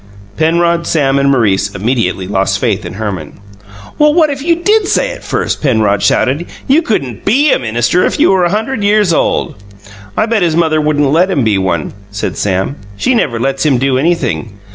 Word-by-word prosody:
Penrod, 170 +1 +1
Sam, 140 -3 +1
and 140 0 +2
Maurice 100 -7 +1
immediately 100 -3 -1
lost 95 0 0
faith 105 -1 -1
in - - -8
Herman. 95 -7 -6 0.6
"What 300 +1 +3
if 275 -1 -5
you 335 +3 +2
did 405 +4 +1
say - - +1
it - - -10
first?" - - -2
Penrod 110 -8 +1
shouted. 145 +7 +1 0.2
"You 285 +5 +4
couldn't 140 - -3
BE 275 +8 +3
a - - +2
minister 120 +9 0
if - - -1
you - - +4
were 190 -2 +2
a 175 - +2
hunderd 220 +3 -2
years 205 -3 +3
old!" 100 - -1 0.6
"I 215 - +2
bet 225 -2 0
his 170 -3 +1
mother 160 -2 +2
wouldn't 145 -2 +1
let 175 +5 +3
him 145 -9 0
be 105 -3 +1
one," 85 -5 -2 0.2
said 100 +1 -4
Sam. 95 +7 -2 0.2
"She 260 - +1
never 125 - 0
lets 135 +2 -1
him 145 -5 +2
do 130 0 +1
anything." 130 - -1
145 Hz, 190 wpm, -13 LUFS, -, 0.6 s, You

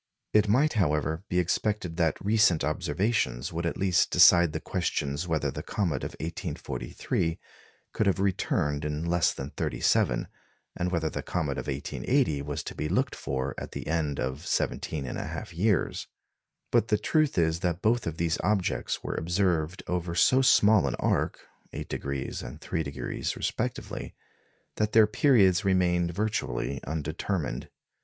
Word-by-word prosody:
It 105 0 +5
might 135 +9 +3
however, 80 -3 0
be 90 - 0
expected 90 0 0
that 80 -3 +1
recent 105 -7 +4
observations 75 - -1
would 85 +1 -1
at - - -3
least 95 -3 +2
decide 85 -2 +7
the - - -3
questions 70 +5 -2
whether 80 -2 0
the - - -5
comet 85 -10 -2
of - - -4
1843 80 - -3 0.6
could 110 - +1
have 95 0 +2
returned 75 -6 0
in 75 +2 -2
less 85 0 +2
than 70 +2 -6
thirty - - -3
seven, - - +2 0.5
and 90 0 -1
whether 85 -3 0
the - - -3
comet 75 -6 -2
of - - -6
1880 75 - 0
was 70 0 -4
to - - -6
be 75 - -3
looked - - +1
for 65 0 -3
at - - -8
the - - -5
end 75 -3 -1
of 65 +6 -3
17 75 -4 -1
1/2 65 - -5
years. 95 +1 +1 0.6
But 110 - +3
the 105 - +2
truth 155 - +1
is 80 -1 +2
that 85 0 -2
both 120 +3 +3 0.2
these 85 -1 0
objects 100 -2 0
were - - -3
observed 85 -1 0
over 90 -1 -2
so 130 +9 +5
small 105 - +5
an 65 - -1
arc - - 0 0.3
8° 70 -1 -4
and - - -8
3° 70 -6 -3
respectively - - -3 0.6
that 105 0 0
their 110 -1 +7
periods 105 -6 +4
remained 90 -3 +2
virtually 95 - -2
undetermined. 80 -1 -3
85 Hz, 150 wpm, -28 LUFS, 75-100 Hz, 0.6 s, decide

